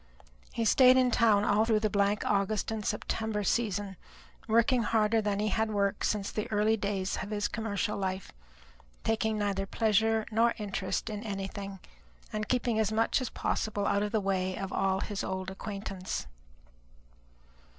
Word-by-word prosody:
He 230 - -1
stayed 255 +3 +6
in 255 -1 +4
town 220 -4 +4
all 205 +1 +3
through 220 -2 +2
the 215 - +2
blank 200 +1 +1
August 200 +1 0
and 220 -1 -3
September 220 0 -2
season, 200 -2 -1 0.5
working 235 +3 +3
harder 220 0 +2
than 205 -1 -1
he 210 +1 +1
had 220 +2 0
worked 200 -2 0
since 205 -2 -1
the 215 - -4
early 215 +1 +3
days 200 -2 -2
of 190 - -6
his 205 -1 -1
commercial 220 -1 -2
life, 190 -1 -3 0.7
taking 220 -1 0
neither 200 -2 -1
pleasure 220 +1 +2
nor 230 +2 +3
interest 195 -3 -3
in 210 -1 -4
anything, 195 -2 -5 0.6
and 215 0 -3
keeping 240 -3 +1
as 215 -1 +1
much 225 +4 +2
as 255 - -2
possible 205 -2 -2
out 200 - +2
of 210 0 -1
the 220 - +2
way 190 -2 -1
of 195 -1 -4
all 190 0 +1
his 205 -2 -3
old 190 0 -3
acquaintance. 195 -1 -5
210 Hz, 160 wpm, -30 LUFS, 195-220 Hz, 0.7 s, stayed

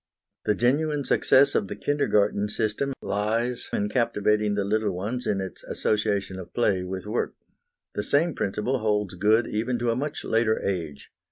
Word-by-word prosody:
The 105 - +2
genuine 145 +6 +1
success 140 +1 +4
of 100 - +1
the 105 - -5
Kindergarten 105 -6 +1
system 110 +6 -1
in 110 0 -1
captivating 105 -2 +1
the 100 - 0
little 105 0 0
ones 110 +8 -3
lies - - +3
in 100 - -1
its 95 -1 -7
association 100 -3 -1
of 90 - -10
play 100 -6 +2
with 95 +1 -5
work. 110 +3 -2 0.6
The - - -2
same 160 +4 +2
principle 105 +6 -1
holds 105 -3 0
good 105 +5 +3
even 115 +4 -1
to 120 0 0
a - - 0
much 145 +4 -3
later 110 -1 +2
age. 80 -7 -3
105 Hz, 165 wpm, -26 LUFS, 100-120 Hz, 0.6 s, success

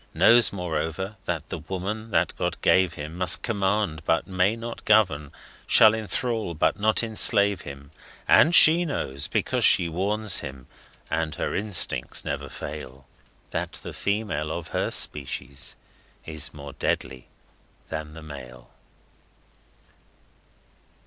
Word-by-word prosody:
Knows, 120 0 +6
moreover, 90 +2 -3
that 80 -3 -3
the - - -5
Woman 95 +7 -5
that - - +1
God - - -3
gave 90 -2 +4
him 75 +1 -7
Must 90 -2 +3
command 100 -6 -1
but 80 +1 +1
may 95 +3 +1
not 115 0 -7
govern; 90 -10 +2 0.4
shall 110 -1 +6
enthrall 110 -3 -2
but 75 - +1
not 110 +2 +3
enslave 100 -3 +3
him. 70 0 -10 0.4
And 170 +3 +6
She 165 +3 +7
knows, 70 - -3
because - - -1
She 85 - +5
warns 100 +4 +1
him 65 -3 -8 0.5
and 80 -1 -1
Her - - -3
instincts 105 -3 0
never - - -4
fail, 65 +1 -8 0.5
That - - -3
the - - -7
female 100 -8 -2
of 85 0 -5
Her - - -1
species 70 - -3 0.5
is 80 -1 -3
more 70 -1 -10
deadly 65 -1 -3 0.6
than 80 -1 -5
the 80 - -10
male! 65 -4 -11
90 Hz, 130 wpm, -25 LUFS, 75-105 Hz, 0.6 s, She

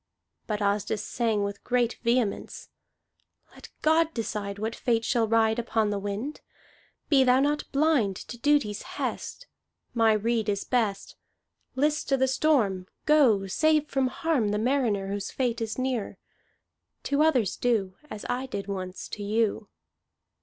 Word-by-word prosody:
But 210 -1 -2
Asdis 205 +1 0
sang 225 -4 0
with 200 0 -5
great 245 -1 0
vehemence: 235 -3 -1 0.8
"Let - - -13
God 320 +1 +3
decide 210 -3 -3
What 220 +2 -3
fate 230 -2 0
shall 230 -3 +1
ride 220 0 +2
Upon 225 -2 0
the 205 - -1
wind. 205 +9 -4 0.7
Be 275 -3 +5
thou 255 0 +4
not 295 +2 0
blind 275 -9 +2
To 240 +5 -9
duty's 285 -8 +2 0.2
hest. - - -4 0.5
My 225 -2 +4
rede 220 0 0
is 200 -1 -1
best. 220 -6 -1 0.6
List 300 +3 0
to 270 - +3
the 265 0 +2
storm! 245 -10 +1 0.2
Go! 255 -10 +4
Save 305 +9 +2
from 270 -1 +1
harm 255 -4 0
The 210 - 0
mariner 220 -5 0
Whose 200 0 -3
fate 245 -3 -1
is 220 -1 -3
near. 255 -4 -2 0.9
To 285 +1 +1
others 260 - +3
do 215 -6 0 0.2
As 210 - -7
I 255 +2 -2
did 200 -6 -4
once 185 -2 -5
to 210 - -6
you." 210 0 0
230 Hz, 145 wpm, -27 LUFS, 205-265 Hz, 0.9 s, Be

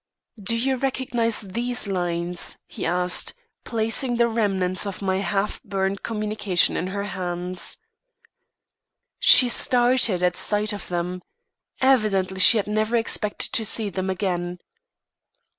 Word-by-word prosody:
"Do 230 +4 0
you 260 +3 0
recognise 245 -3 -1
these 235 +4 0
lines?" 175 -2 -2
he - - -6
asked, 180 +1 +2 0.3
placing 230 +2 +2
the 235 0 +3
remnants 195 -4 0
of 195 - -6
my 190 -1 0
half 195 +2 -2
burned 195 -1 -3
communication 210 -4 -1
in 180 - -2
her 200 +2 -4
hands. 180 -2 -4 1.4
She 250 - +7
started 240 -6 +3
at 180 -1 +1
sight 210 +2 +1
of 205 - -8
them. 180 +1 -4 0.6
Evidently 210 -8 +1
she 205 +5 +7
had 205 - -1
never 215 +2 -1
expected 225 -2 0
to 225 - +2
see 215 -1 +2
them 190 +1 -4
again. 180 -2 -3
200 Hz, 125 wpm, -23 LUFS, 185-230 Hz, 1.4 s, She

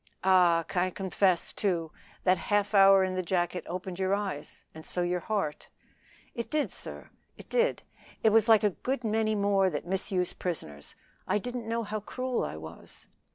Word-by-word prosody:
"Ah! 180 -3 +5
confess, 185 0 0
too, 170 -6 -1 0.3
that 185 -1 +3
half 205 +2 0
hour 195 -1 +7
in 185 0 -1
the 185 - -1
jacket 175 -1 -1
opened 185 +1 -5
your 190 +1 +2
eyes 195 -8 -5
and 160 - -10
so 180 - -1
your 180 0 0
heart." 195 -6 -3 0.6
"It 235 - -5
did, 305 -1 0
sir; - - -10 0.3
it - - -12
did. - - +1 0.4
I - - +8
was 225 +1 +4
like 220 -2 +6
a 210 - +3
good 255 +7 -3
many 220 0 +1
more 200 -2 +2
that 150 -3 -4
misuse 185 0 0
prisoners. 75 - -5 0.3
I - - +2
didn't 245 +1 -5
know 230 0 -1
how 215 0 -3
cruel 255 +4 -3
I - - -4
was." 80 +1 -11
190 Hz, 170 wpm, -29 LUFS, 180-215 Hz, 0.6 s, I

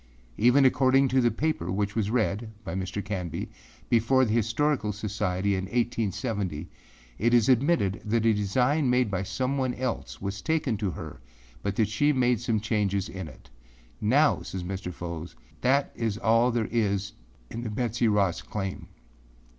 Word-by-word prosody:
Even 125 +4 +5
according 130 +1 +4
to 130 +1 +3
the 120 - +4
paper 115 - -1
which 100 +1 -1
was 105 -3 0
read 110 -1 0
(by 85 - -5
Mr. 95 +2 -3
Canby) 90 -5 -4 0.4
before 125 +3 +3
the 110 - -1
(Historical) 115 +1 +1
Society 100 -2 -1
in 95 -1 -1
1870, 105 - -2 0.5
it 120 +3 +3
is 115 -2 +4
admitted 130 - +2
that 115 +1 0
a 115 - +5
design 125 +8 +1
made 125 -3 +2
by 95 -1 -1
someone 130 +4 -1
else 125 -1 -4
was 100 0 -4
taken 155 -5 0
to 100 -2 -1
her 75 - -8 0.4
but 100 -1 -2
that 110 -1 +2
she 125 +8 +2
made 125 -3 +2
some 115 -3 0
changes 105 -2 0
in 95 -2 -6
it. 70 - -15 0.5
Now,â 140 +8 +3
says 95 -2 -5
Mr. 95 0 -4
Fow, 85 -1 -6 0.3
âthat 135 +2 +2
is 110 -3 -2
all 115 +2 +3
there 115 -3 0
is 100 -4 0 0.4
in 115 - -5
the 120 - -4
Betsey 115 +2 0
Ross 100 -4 +2
claim. 95 -3 -5
110 Hz, 160 wpm, -27 LUFS, 100-125 Hz, 0.5 s, Even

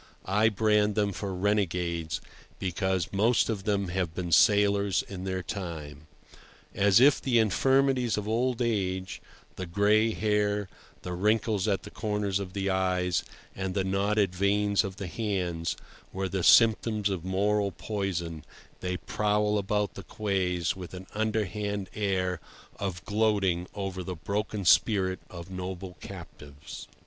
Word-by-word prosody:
I 105 +4 +3
brand 105 -1 +2
them 105 -2 +1
for 100 +1 -4
renegades, 90 -4 0 0.4
because 95 -1 -1
most 110 +4 +3
of 100 -3 -4
them 100 -3 0
have 85 -2 -2
been 90 -2 -3
sailors 100 +1 +4
in 95 -1 -7
their 95 -1 -2
time. 80 -5 -6 0.7
As 100 +1 +4
if 140 +3 +5
the 125 -3 +2
infirmities 125 +3 +3
of 105 0 -3
old 120 +2 +1
age—the 95 -3 -4
gray 105 +5 +3
hair, 105 -1 0 0.4
the 90 - -4
wrinkles 105 +2 +1
at 100 -2 0
the - - -10
corners 105 -3 -1
of 95 -2 -6
the 100 -1 -2
eyes, 90 -2 +1 0.3
and 95 -1 -3
the 95 - +1
knotted 100 0 +1
veins 100 +2 +2
of 95 -1 -5
the 100 - -6
hands—were 90 -1 -4
the 95 -1 -2
symptoms 110 +1 +5
of 95 -4 -3
moral 100 +2 +1
poison, 85 -8 -3 0.4
they 90 0 -2
prowl 105 +1 +1
about 105 +1 -1
the - - -8
quays 90 -4 -1
with 90 -1 -8
an 90 +1 -8
underhand 105 -2 -2
air 95 -4 -1 0.4
of 95 -2 -4
gloating 100 -5 +1
over 95 -2 -4
the 90 0 -5
broken 100 +4 -3
spirit 95 -1 +4
of 85 +1 -9
noble 95 0 -6
captives. 70 +1 -10
100 Hz, 135 wpm, -28 LUFS, 90-105 Hz, 0.7 s, if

